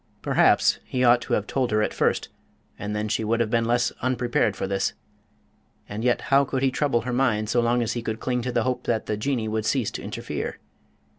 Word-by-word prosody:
Perhaps - - +4
he 130 -1 -2
ought 120 0 +5
to - - -4
have 105 - +1
told 130 0 -1
her 105 0 +2
at - - -1
first, - - 0 0.5
and 105 0 -4
then 105 0 -1
she 110 - -1
would 115 +2 0
have 115 -2 0
been 115 -1 +2
less 120 +1 +1
unprepared 120 -4 +1
for - - -3
this 95 0 -1 0.9
and 105 +2 -5
yet 125 -1 +2
how 140 +1 +6
could 135 -1 -2
he 135 - +3
trouble 130 -3 +1
her 125 +2 -4
mind 115 -5 +1
so 120 +2 +2
long 120 +1 +2
as 115 +1 -1
he 120 - -3
could 110 -1 -4
cling 125 -1 -1
to 125 +1 -3
the 120 -1 +1
hope 125 0 -2
that 115 -2 0
the 105 - -1
Jinnee 115 0 -1
would 110 0 -1
cease 115 0 0
to - - -6
interfere? - - -5
120 Hz, 230 wpm, -25 LUFS, 110-125 Hz, 0.9 s, how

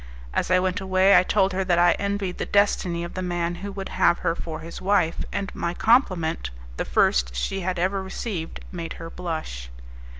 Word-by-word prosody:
As - - 0
I 185 - +5
went 185 +2 0
away, 190 +1 +4
I - - +8
told 190 +1 +2
her 190 +1 0
that 180 -2 +2
I 175 0 +6
envied 200 -2 -2
the - - -1
destiny 185 -4 +2
of 175 - -6
the 185 - -4
man 175 -1 -1
who 200 0 -5
would 195 -1 -5
have 170 - +3
her 165 - +3
for 160 -2 -6
his 165 +1 -8
wife, 185 -4 +2
and 200 -1 -3
my 170 +1 -3
compliment, 185 - +2 0.3
the - - -1
first - - +2
she 195 - -1
had 185 0 -2
ever 190 +3 0
received, 190 -3 -5
made 170 -2 -5
her 165 0 -8
blush. 155 - -5
180 Hz, 200 wpm, -24 LUFS, 170-195 Hz, 0.3 s, I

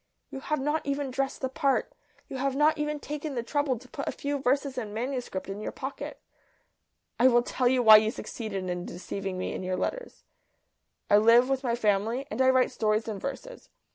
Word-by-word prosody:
You 270 - -5
have 300 +2 -2
not 295 +3 0
even 280 -1 -2
dressed 270 +1 -2
the 260 - 0
part. 275 0 0 0.3
You 270 - -6
have 270 0 -1
not 305 +2 +3
even 300 0 -2
taken 295 0 -5
the 235 - -2
trouble 285 0 0
to 255 +3 -14
put 280 - -6
a - - +1
few 285 0 -3
verses 270 +1 0
in 215 -4 -5
manuscript 245 -4 -3
in 195 +2 -6
your - - -4
pocket. 270 +1 -6 1.0
I 250 - +7
will 240 -1 +4
tell 250 0 0
you 250 0 +3
why 220 -1 +10
you 215 0 +2
succeeded 215 -4 -5
in 180 0 -3
deceiving 190 +1 -5
me 185 - -3
in - - -4
your 185 0 -2
letters. - - -4 0.8
I 205 - +6
live 230 +4 +6
with 270 -1 0
my 235 -2 +1
family, 220 +3 0
and - - -1
I 260 - +5
write 260 -1 +3
stories 215 0 0
and 205 -3 -4
verses. 275 - -7
255 Hz, 205 wpm, -28 LUFS, 215-275 Hz, 1.0 s, why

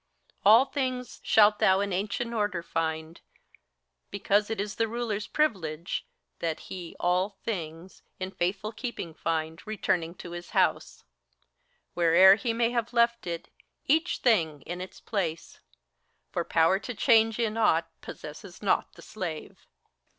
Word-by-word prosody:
All 225 +6 +7
things 255 -3 -3
shalt 210 -1 +5
thou 190 0 +4
in 200 -1 -1
ancient 215 +5 -2
order 205 -6 -1
find: 160 0 -3 0.9
because 205 +1 +1
It 225 - -3
is 205 0 -2
the 225 - +1
Ruler's 220 -2 -3
privilege, 170 - -1 0.3
that 165 -2 -2
he 175 -3 -7
all 180 +3 0
things 170 -4 -5 0.2
In 185 0 -4
faithful 195 +4 -2
keeping 225 -8 -6
find, 160 0 -2
returning 180 -5 -1
to 175 - -9
his 175 0 -7
house, - - +1 0.5
— - - -45
Where'er 175 +3 +7
he 230 +3 -1
may 230 +1 +1
have 235 -1 -2
left 235 -3 +2
it, 170 -1 -5 0.4
each 320 +5 +2
thing 165 - +2
in 175 +2 -6
its 185 - -9
place; 170 -7 -3 0.7
For 170 - -1
power 165 +4 +3
to 240 +3 -6
change 225 -2 +4
in 225 -2 0
aught 170 -7 +3
possesses 175 +6 -10
not 195 - +1
the - - -14
slave." 175 -7 -7
195 Hz, 145 wpm, -28 LUFS, 170-225 Hz, 0.9 s, All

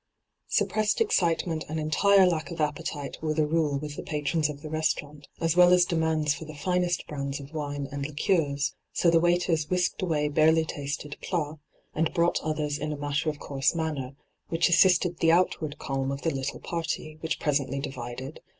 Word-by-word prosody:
Suppressed 215 -1 +1
excitement 170 - +1
and 160 +1 -2
entire 190 +6 +4
lack 170 -2 0
of 170 -1 -7
appetite 150 -1 -3
were 155 -1 -1
the 155 -1 +2
rule 150 -2 +1
with 150 +1 -6
the - - -3
patrons 150 +1 -1
of 145 0 -8
the 155 - -6
restaurant, 150 -2 -2
as 165 0 +1
well 180 0 +7
as 180 -1 +6
demands 160 -3 +1
for 155 - -7
the 155 0 -9
finest 180 +2 0
brands 140 -1 -4
of 140 +2 -11
wine 145 -2 -3
and 140 0 -3
liqueurs, 145 -2 0 0.2
so 170 - +3
the 165 - +5
waiters 175 -2 +1
whisked 180 -1 0
away 155 -5 +1
barely 160 +2 +4
tasted 145 0 -5
plats, 155 -4 -2 0.3
and 160 +2 0
brought 170 0 +2
others 150 -1 -2
in 150 - -3
a 150 - -4
matter 145 +2 -1
of 150 - -4
course 140 +2 0
manner, 145 -5 -3 0.3
which 165 +2 +2
assisted 180 -1 +4
the 165 - +4
outward 165 -4 +1
calm 135 0 -2
of 140 0 -5
the 165 - +1
little 135 0 -3
party, 160 -2 -4
which 160 -1 -2
presently 140 -2 0
divided. 130 +1 -6
155 Hz, 185 wpm, -27 LUFS, 145-165 Hz, 0.3 s, well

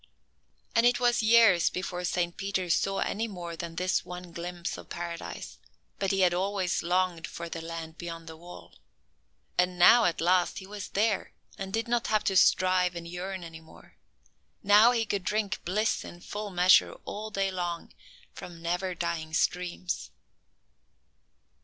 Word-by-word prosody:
And 230 - +4
it 240 0 +4
was 240 -1 +3
years 220 -6 +5
before 180 -1 -4
Saint 175 -1 -1
Peter 190 -3 -2
saw 195 +3 +1
any 225 +3 -1
more 175 -5 -7
than 165 0 -6
this 185 +2 0
one 180 0 -9
glimpse 175 0 -5
of - - -11
Paradise; 170 -1 -6 0.4
but 195 - 0
he 195 -1 +1
had 180 -1 +4
always 190 -1 0
longed 180 -1 0
for 170 - -7
the 165 - -5
land 165 -1 -7
beyond 165 -1 -7
the 160 0 -9
wall. 175 +2 -12 0.9
And 180 0 +2
now 230 +7 +7
at 170 - 0
last 180 +1 +2
he 190 - -7
was 205 0 -7
there, 210 0 0 0.2
and 195 0 -6
did 225 +3 -1
not 240 0 0
have 215 -1 +2
to 195 - 0
strive 185 -1 +4
and 170 0 -6
yearn 180 +2 -5
any 165 -1 -10
more. 160 - -18 0.7
Now 210 +4 +7
he 230 -2 0
could 200 -3 -2
drink 210 +1 -1
bliss 210 +5 0
in 175 - -11
full 210 +2 -5
measure 180 0 +5
all 215 +1 -5
day 195 -2 -1
long 175 -2 -4 0.4
from 170 -2 -10
never 175 +2 -2
dying 165 -2 -3
streams. 180 +1 -1
180 Hz, 165 wpm, -28 LUFS, 170-200 Hz, 0.9 s, now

